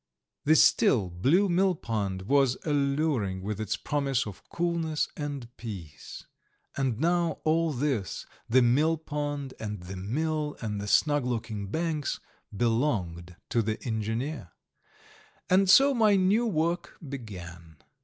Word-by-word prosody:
The 155 +2 +5
still, 125 - +4
blue 145 - +3
millpond 115 - 0
was 135 +3 +3
alluring 140 - 0
with 105 +1 -3
its 110 - -2
promise 135 -3 -1
of 105 -3 -8
coolness 170 -3 -1
and 140 -5 -6
peace. 90 -10 -8 0.5
And 130 -5 -1
now 170 +1 +1
all 165 +1 +2
this 130 -7 -2 0.2
the 125 +2 +5
millpond 145 +1 0
and 105 -3 -5
the 95 +2 -7
mill 150 +9 -2
and 105 -3 -3
the 105 - -5
snug 145 +5 +3
looking 110 -4 -3
banks 155 - -2 0.3
belonged 100 - -1
to 115 - +2
the 110 0 -2
engineer! 115 - -3 1.0
And 190 +1 +4
so 275 +7 +7
my 215 -4 +4
new 200 +5 +3
work 170 -2 -1
began. 85 - -9
135 Hz, 125 wpm, -28 LUFS, 105-160 Hz, 1.0 s, so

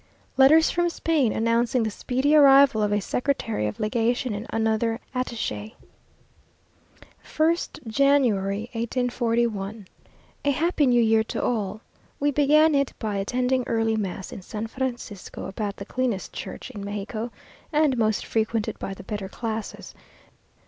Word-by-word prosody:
Letters 285 +5 +6
from 345 0 +1
Spain, 315 -8 +1
announcing 230 +2 +1
the 220 - -1
speedy 260 +7 0
arrival 275 -5 +7
of 210 -1 +1
a 205 - +2
Secretary 225 - -1
of 105 - -6
Legation 235 +2 0
and 205 +3 -5
another 225 +1 0
attache. 235 -3 -3 1.5
1st 315 -2 -1
January, 220 -6 +2
1841. 230 -4 -1 0.6
A 285 - +2
happy 305 +1 +2
New 240 -1 +4
Year 220 0 +4
to - - -3
all! 215 -3 -1 0.4
We 290 +1 +2
began 300 +3 +4
it 280 -1 +1
by 210 -3 -3
attending 250 +5 0
early 225 -1 +1
mass 190 -3 -4
in - - -8
San 210 +4 -5
Francisco, 240 -5 -5
about 200 0 -4
the 200 - -8
cleanest 245 -4 -2
church - - -7
in 205 -5 -7
Mexico, 210 +3 -4 0.4
and 300 -3 +3
most 220 -3 0
frequented 220 -1 -1
by 195 - -5
the - - -11
better 205 -1 -5
classes. 220 0 -5
230 Hz, 135 wpm, -25 LUFS, 215-265 Hz, 1.5 s, arrival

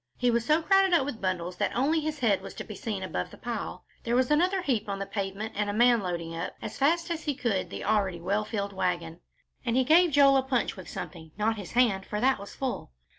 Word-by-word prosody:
He 245 -1 +2
was 235 0 +1
so 305 +6 +2
crowded 390 0 +4
up 275 - +3
with 265 -6 -5
bundles 180 -1 -2
that - - -1
only 285 +7 +2
his 310 0 -3
head 220 -8 +2
was - - -9
to - - -5
be 215 - -8
seen 200 -1 -4
above 90 - -3
the - - -13
pile; 235 -3 -5 0.2
there 235 +1 0
was 255 +2 +2
another 360 +5 +2
heap 225 - 0
on 200 - -2
the 195 - -3
pavement 200 +2 -4
and 205 0 -1
a - - -1
man 240 +1 +4
loading 170 -3 -4
up, 165 +2 -4
as 220 0 -6
fast 335 +5 +1
as 330 -2 -3
he 290 -2 0
could, 225 -8 -1
the - - -6
already 195 -5 +1
well 200 +5 0
filled 200 -2 -3
wagon, 175 -3 -2 0.4
and 235 -2 0
he 260 - +4
gave 335 +6 +5
Joel 275 -2 +6
a - - +4
punch 260 -2 -1
with 185 - -10
something, 160 -3 -8
not 220 +1 +1
his 200 -3 -8
hand, 220 -6 +2
for 210 - -3
that 260 +1 +3
was 200 - -10
full. 265 -2 -3
225 Hz, 250 wpm, -28 LUFS, 195-275 Hz, 0.4 s, Joel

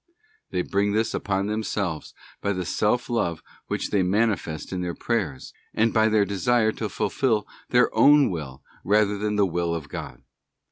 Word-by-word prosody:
They 90 -1 -1
bring 100 +2 0
this 110 +1 0
upon 100 0 -1
themselves 100 -6 -3 0.3
by 100 - 0
the 90 -1 -3
self 105 +8 0
love 110 -9 -1 0.2
which - - -3
they 100 - +3
mani 105 +4 +2
fest 80 0 -7
in 90 - -2
their 90 -1 -3
prayers, 95 - -3 0.2
and 110 +1 +2
by 110 0 +4
their 105 -2 +3
desire 110 +3 +2
to 110 -1 -4
fulfil 105 +1 0 0.2
their 125 0 +3
own 145 -3 +6
will 70 -6 -6 0.2
rather 105 0 +3
than 105 0 -1
the 105 -1 +3
Will 85 -1 -1
of 75 -3 -6
God. - - -7
105 Hz, 175 wpm, -25 LUFS, 90-110 Hz, 0.3 s, own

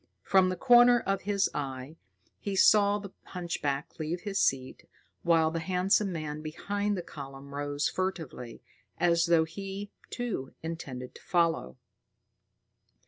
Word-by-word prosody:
From 190 -1 +4
the 185 - -1
corner 245 +3 +6
of 195 -1 -1
his 200 -1 +3
eye, 135 +1 -5 0.4
he 200 -1 -3
saw 205 +1 +5
the 200 -2 -8
hunchback 165 -4 -4
leave 160 +3 -3
his 200 -2 -2
seat, 130 -6 0 0.3
while 165 -2 +3
the 165 - -2
handsome 185 +3 +1
man 155 -3 -4
behind 200 +6 -2
the 175 - -4
column 140 -2 -9
rose 145 +1 -1
furtively, 160 -11 -4 0.3
as 170 0 +3
though 170 -1 +5
he, 195 +4 -6 0.2
too, 225 - -4
intended 140 -6 -6
to - - -14
follow. 165 - 0
170 Hz, 135 wpm, -29 LUFS, 145-195 Hz, 0.4 s, corner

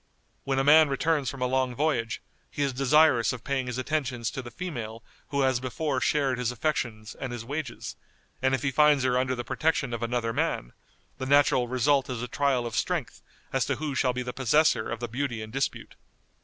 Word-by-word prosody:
When 135 -1 0
a 135 - +2
man 155 +1 +7
returns 145 0 +1
from 135 -2 -4
a - - +2
long 130 -1 0
voyage, 130 -5 -1 0.3
he 145 - -2
is 140 -2 0
desirous 135 -1 +4
of 125 -2 -8
paying 135 -2 -1
his 125 0 -3
attentions 130 -4 -2
to 135 - -5
the 120 - -9
female 115 -6 -6 0.2
who 140 -1 -1
has 130 -2 +2
before 130 +2 -2
shared 135 -4 +1
his 125 -1 0
affections 120 -5 -2
and 130 - -6
his 120 -2 -6
wages, 145 -1 -5 0.4
and 130 0 +3
if 125 - -5
he 140 - +1
finds 150 -1 +4
her 125 -1 +2
under 130 0 +1
the 120 - -4
protection 155 0 0
of 115 - -3
another 115 -1 -1
man, - - -1 0.5
the 130 - -3
natural 140 -3 +4
result 130 +3 +2
is 125 -2 -3
a - - -3
trial 130 -1 +1
of 115 -1 -4
strength 170 0 -2 0.3
as - - +2
to - - 0
who 150 -2 -3
shall 130 -1 +2
be 125 0 -3
the 125 0 -5
possessor 130 -1 +2
of 115 0 -4
the 120 - -2
beauty 120 0 -3
in 110 0 -7
dispute. 135 +2 -3
130 Hz, 210 wpm, -27 LUFS, 120-140 Hz, 0.5 s, man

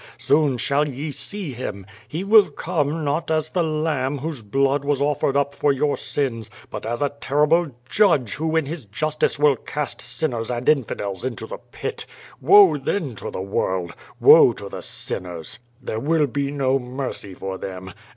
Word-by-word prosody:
Soon 145 -3 +2
shall 145 +4 +1
ye 145 +3 -5
see 195 +1 -5
Him. 100 -6 -6 0.2
He 165 +5 -4
will 205 -2 +6
come 155 0 -2
not 145 +4 -1
as 155 -1 0
the 180 - +1
Lamb 155 -4 -1
whose 145 -2 -5
blood 135 +6 +1
was 140 -1 0
offered 140 -1 +1
up 140 0 +1
for 145 0 +2
your 140 +2 +1
sins, 115 -6 -2 0.2
but 105 +1 -5
as 120 +5 -1
a 145 - +2
terrible 150 +5 +2 0.2
Judge 160 - +3
who 160 +1 -2
in 160 -2 +2
his 150 -3 -6
justice 155 +9 -1
will 145 -1 +4
cast 150 +5 -4
sinners 120 -8 -2
and 120 0 -3
infidels 105 -9 0
into 130 -3 -3
the - - -7
pit. - - -5 0.3
Woe 170 0 +7
then 135 - -2
to - - -10
tlie 95 - -4
world! 95 -3 -1 0.3
Woe - - +8
to - - -8
the - - -7
sinners! 85 -3 -5 0.2
There 110 -4 -4
will 155 +3 +2
be 140 +1 -2
no 135 -2 +1
mercy 125 -6 -5
for 95 0 -5
them. 95 -1 -7
140 Hz, 175 wpm, -22 LUFS, 120-155 Hz, 0.3 s, Woe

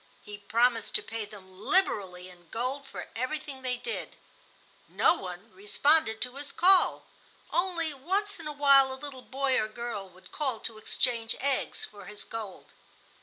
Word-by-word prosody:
He 205 -1 -9
promised 230 +3 +2
to - - +1
pay 225 -1 -4
them 190 -3 -14
liberally 195 - +1
in 175 -2 -16
gold 260 +4 -3
for - - -7
everything 265 +2 -3
they 250 -1 -1
did. 460 - -5 0.7
No - - +4
one 185 - -7
responded 220 +5 +3
to 250 +2 -2
his 285 0 -5
call—only 355 -2 +2
once 390 +8 0
in 320 - -7
awhile 280 -2 +6
a - - -4
little 265 -1 -8
boy 265 0 +1
or 215 - -1
girl 215 -4 -5
would 185 +1 -18
call 265 -7 -1
to 220 -1 -5
exchange 230 0 0
eggs 275 -1 -1
for 205 -1 -12
his 210 0 -8
gold. 215 -4 -7
250 Hz, 155 wpm, -29 LUFS, 210-285 Hz, 0.7 s, awhile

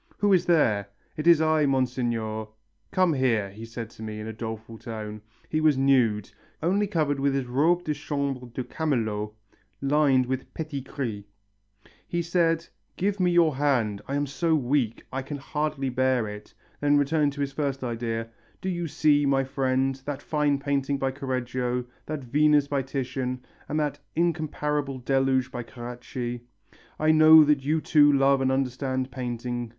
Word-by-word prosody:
'Who 205 -1 +3
is 180 - +3
there?' 110 - +3 0.3
'It 155 0 -3
is 170 -2 +7
I, 155 -2 +3
Monseigneur 120 -5 -1 0.2
' 110 +1 -45
'Come 185 -3 +3
here,' 115 -7 +1
he 110 +3 -9
said 115 0 -7
to - - -14
me 110 -1 -5
in 105 - -6
a 110 - -5
doleful 110 0 -7
tone. 105 -2 -6 0.3
He 155 - -1
was 155 -3 +4
nude, 125 -7 +2 0.3
only 200 +5 +2
covered 155 -7 0
with 140 0 +1
his 135 -2 -1
robe 155 +8 +2
de 155 - -1
chambre 140 -4 -3
de 120 +2 -5
camelot 115 -7 -1 0.5
lined 140 -2 +3
with 130 +1 -4
petit 155 -3 -4
gris. 125 -6 -5 0.8
He 170 0 -1
said, 165 -1 +1 0.3
'Give 200 +2 0
me 180 -1 +3
your 170 -4 +4
hand, 120 -8 +1
I 140 - -2
am 145 0 +1
so 160 +4 0
weak; 130 -4 0
I 135 - -1
can 140 +2 -6
hardly 145 -1 -2
bear 130 -2 +1
it 105 0 -9 0.2
' - - -34
Then 145 0 +4
returning 145 +1 +2
to 145 0 -6
his 140 -1 -1
first 135 -2 -2
idea, 115 -1 -3 0.3
'Do 190 - -3
you 175 -2 -2
see, 145 -2 +3
my 135 -1 +3
friend, 135 0 0
that 145 -1 -4
fine 150 -2 +1
painting 140 0 -1
by 135 0 -1
Correggio, 125 -2 -2 0.2
that 155 -2 -4
Venus 145 +3 +3
by 140 -1 0
Titian 130 -1 -3 0.2
and 155 - 0
that 145 -1 -1 0.2
incomparable 150 -4 -1
Deluge 130 0 +1
by 120 -2 -4
Carracci 120 0 -6 0.6
I 155 0 +3
know 155 0 +8
that 145 -2 +2
you 155 +3 +1
too 145 -2 +5
love 135 -1 +3
and 130 0 +2
understand 130 0 -1
painting. 120 -1 -4
135 Hz, 170 wpm, -26 LUFS, 125-150 Hz, 0.8 s, know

